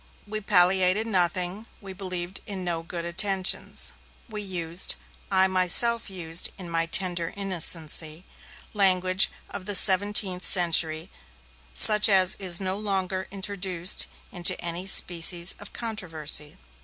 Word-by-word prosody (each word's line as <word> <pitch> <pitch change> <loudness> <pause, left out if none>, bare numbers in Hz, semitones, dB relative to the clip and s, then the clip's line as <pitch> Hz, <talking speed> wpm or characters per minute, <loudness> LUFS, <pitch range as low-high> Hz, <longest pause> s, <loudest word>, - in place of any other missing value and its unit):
We 215 +1 -7
palliated 190 +1 +3
nothing, 185 +1 -2
we 195 -2 -11
believed 185 -1 -4
in 195 -3 -7
no 170 -2 -3
good 170 0 -7
intentions, 190 +2 -1 0.3
we 215 -3 -8
used 175 -3 -3 0.3
(I 190 -1 +2
myself 190 +5 +3
used, 170 -3 -1
in 180 -3 -10
my 165 0 -2
tender 175 -1 +1
innocency) 165 -4 -1 0.5
language 185 -2 +2 0.2
of 185 - -9
the 205 - +1
seventeenth 190 -1 +3
century 165 -2 +1 0.6
such 210 - +6
as 190 -2 +2
is 180 -3 0
now 190 -1 -4
no - - -6
longer 190 -2 -4
introduced 190 -2 -2 0.2
into 175 -2 +2
any 175 +2 -5
species 175 -1 +4
of 205 - -12
controversy. 160 -10 -4
185 Hz, 125 wpm, -24 LUFS, 175-195 Hz, 0.6 s, such